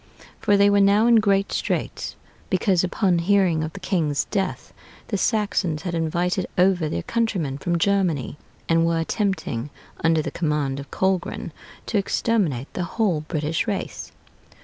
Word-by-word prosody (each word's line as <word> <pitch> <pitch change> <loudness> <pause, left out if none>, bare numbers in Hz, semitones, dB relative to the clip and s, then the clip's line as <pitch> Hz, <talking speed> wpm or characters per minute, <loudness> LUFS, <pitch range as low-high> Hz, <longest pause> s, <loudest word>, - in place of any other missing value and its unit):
For 205 -2 +3
they 200 0 +5
were 205 0 +4
now 200 +3 +4
in 235 -1 +6
great 200 -2 +2
straits, - - -2 0.3
because, 185 -2 +2
upon 185 -1 +1
hearing 180 -3 +2
of 155 - -5
the 195 - -8
king's 165 -7 0
death, 195 -3 -2 0.4
the 210 - -1
Saxons 200 -8 0
had 175 -3 -3
invited 175 +3 0
over 180 -3 +3
their 85 - -3
countrymen 185 -12 -1
from 175 +3 0
Germany, 170 -7 0 0.3
and 165 0 +3
were 165 0 +1
attempting, 165 - -2 0.3
under 160 -1 +3
the - - -4
command 150 -4 -1
of 140 - -9
Colgrin, 190 -3 -1 0.3
to 210 - +1
exterminate 190 - 0
the 180 - -2
whole 195 -9 +2
British 155 0 -1
race.... - - -4
180 Hz, 150 wpm, -23 LUFS, 155-200 Hz, 0.4 s, in